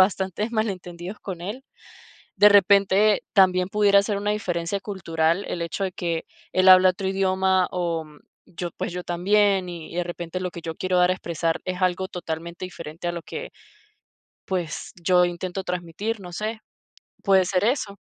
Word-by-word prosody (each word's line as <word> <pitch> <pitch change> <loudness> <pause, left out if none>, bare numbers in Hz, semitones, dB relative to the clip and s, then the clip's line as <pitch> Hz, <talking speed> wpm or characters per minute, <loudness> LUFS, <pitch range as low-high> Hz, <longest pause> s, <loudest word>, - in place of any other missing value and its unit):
bastantes 190 +3 +1
malentendidos 190 -4 -4
con 180 -4 -6
él. 210 +9 -6 0.7
De 205 +2 +7
repente 200 +1 +4
también 185 -2 +4
pudiera 200 -1 +4
ser 205 -1 -1
una 205 +1 -1
diferencia 185 -2 -2
cultural 170 -3 -1
el 170 - -4
hecho 170 +4 -2
de 185 - -4
que 170 -3 -3 0.3
él 185 0 +3
habla 185 0 +9
otro 190 +1 -3
idioma 190 -1 +2
o 170 -3 -2 0.4
yo, 175 0 -6
pues - - -3
yo 180 0 -5
también 190 +1 +2
y 170 -2 -8
y - - -8
de 175 - 0
repente 175 +1 -5
lo 180 -1 -3
que - - -8
yo 165 -1 -5
quiero 185 +1 0
dar 180 0 +4
a - - +3
expresar 170 -2 -2
es 185 0 -4
algo 185 +1 0
totalmente 170 +1 -5
diferente 170 -1 -7
a 175 - -1
lo 170 - -5
que, 460 - -7 1.0
pues 180 -4 -3
yo 180 +1 +4
intento 175 +2 -4
transmitir, 180 +5 -3
no 180 -2 -9
sé. 215 +4 -4 0.6
¿Puede 190 -2 +4
ser 185 +1 0
eso? 225 -4 0
185 Hz, 170 wpm, -24 LUFS, 175-200 Hz, 1.0 s, habla